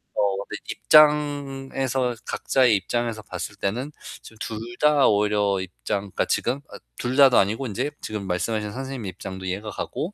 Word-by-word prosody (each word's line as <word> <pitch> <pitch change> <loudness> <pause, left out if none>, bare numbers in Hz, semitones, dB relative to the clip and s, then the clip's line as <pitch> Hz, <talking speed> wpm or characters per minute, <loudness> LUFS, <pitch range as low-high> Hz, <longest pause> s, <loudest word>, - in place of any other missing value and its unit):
어 100 -1 +1
근데 - - -6
입장에서 135 -4 +3
각자의 125 -5 +3
입장에서 115 +3 -2
봤을 - - -6
때는 125 +9 -2 0.3
지금 110 - -14
둘 110 - -4 0.2
다 150 -2 +5
오히려 105 -2 +2
입장 95 +2 -3
그니까 - - 0
지금 125 +3 0
어 - - -7 0.2
둘 125 +1 -2
다도 135 -3 +7
아니고 110 +7 +2
인제 125 +7 -2
지금 105 -3 -5
말씀하신 105 +4 -1
선생님 130 -3 -5
입장도 95 0 -7
이해가 100 +4 -3
가고 180 - -4
115 Hz, 345 characters per minute, -24 LUFS, 100-135 Hz, 0.3 s, 다도